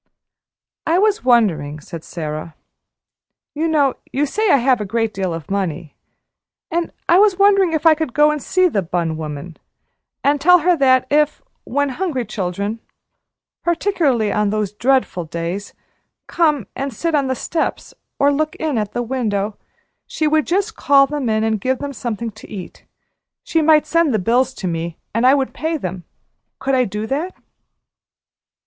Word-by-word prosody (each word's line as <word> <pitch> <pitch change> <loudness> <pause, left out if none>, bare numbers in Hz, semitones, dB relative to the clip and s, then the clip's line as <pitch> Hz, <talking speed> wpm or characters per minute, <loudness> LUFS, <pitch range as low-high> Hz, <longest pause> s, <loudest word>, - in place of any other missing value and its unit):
"I 330 +2 +3
was 415 +1 +2
wondering," 195 - +2
said 165 +2 -9
Sara, 155 -1 -6 1.0
"you 315 +2 -1
know 290 -5 +2
you 285 +3 +1
say 425 +9 0
I - - +6
have 255 -2 +2
a - - 0
great 225 +2 -1
deal 190 -2 -2
of 165 +3 -6
money 175 -6 -3 0.8
and 340 0 -1 0.2
I 350 - +5
was 405 -3 +4
wondering 395 -3 +4
if 315 +1 -1
I 325 - +8
could 310 -3 -3
go 300 +1 +5
and 300 -1 -3
see 370 +5 +2
the 210 - 0
bun 170 -2 -2
woman 155 +1 -7 0.7
and 285 0 +2
tell 360 +4 +7
her 355 +2 +3
that 260 -3 +4
if, 300 0 +2 0.2
when 285 +2 0
hungry 270 -4 -2
children 200 +1 -3 0.8
particularly 320 - +1
on 210 -1 +1
those 210 -2 -1
dreadful 235 -5 0
days 170 +5 -5 0.5
come 300 - +1
and 275 +1 -3
sit 330 +9 -2
on 285 -3 +2
the 260 - -1
steps 320 +6 -3 0.2
or 280 +1 +4
look 310 +2 -1
in 305 -7 -1
at 210 -1 -3
the 240 - -1
window, 215 -5 -2 0.5
she 310 - -1
would 310 0 +2
just 400 +5 0
call 275 -1 +5
them 280 -3 -3
in 220 0 +1
and 220 -2 0
give 260 +3 0
them 285 +1 -5
something 230 -1 -4
to - - -14
eat, 190 -4 -9 0.6
she 325 - +1
might 310 -1 +5
send 335 -3 +2
the 220 - +2
bills 240 +6 +2
to 190 - -4
me 165 -1 -3 0.2
and 230 +3 +3
I 265 - +6
would 270 -2 -1
pay 320 +1 -2
them 185 - -6 0.5
could 270 0 -2
I 255 -1 +3
do 210 +1 -4
that?" 300 +10 -3
260 Hz, 170 wpm, -19 LUFS, 200-310 Hz, 1.0 s, I